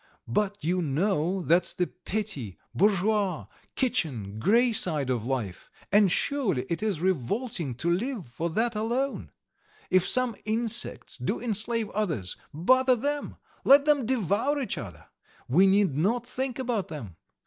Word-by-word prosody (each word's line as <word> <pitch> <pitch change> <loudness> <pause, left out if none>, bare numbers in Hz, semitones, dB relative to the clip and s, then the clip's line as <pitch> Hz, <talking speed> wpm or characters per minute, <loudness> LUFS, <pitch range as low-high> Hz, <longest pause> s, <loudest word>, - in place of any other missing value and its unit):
But 205 -1 0
you 180 +3 +1
know 175 +3 0
that's 170 +2 +3
the 180 - 0
petty, 180 - -4 0.2
bourgeois, 200 -2 +1 0.3
kitchen, 135 - -1
grey 235 - +3
side 150 -10 +2
of 120 -2 -2
life, 110 -10 -3 0.2
and 205 -2 +5
surely 205 - 0
it 170 - -1
is 205 -7 -1
revolting 185 - -1
to 135 - -3
live 220 - -2
for 145 +8 -4
that 225 +7 0
alone? 240 +6 -2 0.6
If 185 -1 +4
some 255 -3 +3
insects 230 +1 -3
do - - -1
enslave 230 0 -2
others, 160 - -2 0.2
bother 255 - +3
them, 285 +4 -3 0.3
let 280 +1 +7
them 290 -6 +3
devour 255 - +1
each 250 -7 -2
other! 90 - -9 0.4
We 180 +10 +5
need 195 -6 +3
not 225 +10 +1
think 255 0 -3
about 245 -6 -1
them. 115 - -8
200 Hz, 140 wpm, -27 LUFS, 160-235 Hz, 0.6 s, let